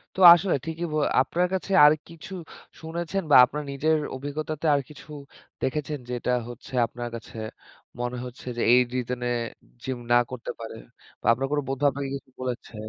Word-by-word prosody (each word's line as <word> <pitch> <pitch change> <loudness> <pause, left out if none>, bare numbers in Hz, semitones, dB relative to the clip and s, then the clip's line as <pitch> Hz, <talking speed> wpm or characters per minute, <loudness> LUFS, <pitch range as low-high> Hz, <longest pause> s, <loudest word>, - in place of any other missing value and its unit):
তো 190 - -4
আসলে 175 +2 0
ঠিকই 165 +1 -3
বলে 150 -1 +2
আপনার 175 +6 0
কাছে 190 +1 -3
আর 150 - +8 0.2
কিছু 165 +3 -11 0.5
শুনেছেন 170 +4 -3
বা - - +8
আপনার 150 +4 -4
নিজের 155 +3 +1 0.2
অভিজ্ঞতাতে 150 +3 -4
আর 140 - +2
কিছু 150 0 -14 0.5
দেখেছেন 150 +2 -2
যেটা 125 0 -2 0.2
হচ্ছে 120 +3 -11
আপনার 120 +1 -6
কাছে 115 -1 -9 0.6
মনে 120 0 -2
হচ্ছে 125 0 -10
যে, - - -3
এই 125 - +7
রিজনে 125 -1 -2 0.5
জিম 130 -2 -3
না 120 - +7
করতে 125 -2 -6
পারে। 115 -1 -7 0.4
বা - - -8
আপনার 130 +4 -1
কোন 150 - +2
বন্ধু 135 +2 -2
আপনাকে 140 +1 -4
কিছু 135 - -12
বলেছে? 125 -2 -5
140 Hz, 170 wpm, -26 LUFS, 125-155 Hz, 0.6 s, আর